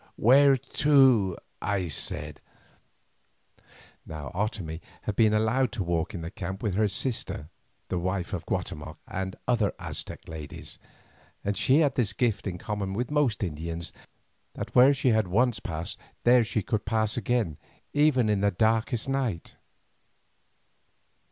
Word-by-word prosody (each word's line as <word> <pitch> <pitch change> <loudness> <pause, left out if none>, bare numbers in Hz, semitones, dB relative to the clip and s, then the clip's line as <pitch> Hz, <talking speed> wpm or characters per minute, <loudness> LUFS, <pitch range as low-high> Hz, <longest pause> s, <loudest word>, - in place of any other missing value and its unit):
"Where 135 +4 +6
to?" 130 - +4 0.2
I 95 -3 0
said. 75 - -4 1.6
Now 75 -2 -7
Otomie 90 -5 -3 0.2
had 105 - -2
been 110 -1 +4
allowed 110 +3 +2
to 100 - -2
walk 85 +2 -1
in 85 - -4
the 80 +2 -6
camp 95 +3 -6
with 105 -4 0
her 105 +3 +2
sister, 100 - -3 0.4
the 90 - -1
wife 90 0 -2
of - - -4
Guatemoc, - - -4
and 95 0 -4
other 115 -5 +2
Aztec - - -6
ladies, 80 -2 -7 0.6
and 100 0 -1
she 135 +9 +4
had 145 -3 +3
this 110 -6 +1
gift 110 -1 0
in 90 -2 -3
common 100 0 -3
with 120 +5 -2
most 145 -9 +1
Indians, 85 0 -4 0.6
that - - -6
where 125 +3 +7
she 130 - +2
had 110 -4 +3
once 115 +5 +2
passed 80 0 -5 0.2
there 120 0 +6
she 110 -1 -1
could 105 +2 -1
pass 110 -1 0
again, 115 -9 0 0.4
even 145 -5 +4
in 105 -2 +1
the 100 - +4
darkest 110 +4 +1
night. 130 -10 -2
105 Hz, 145 wpm, -27 LUFS, 90-125 Hz, 1.6 s, where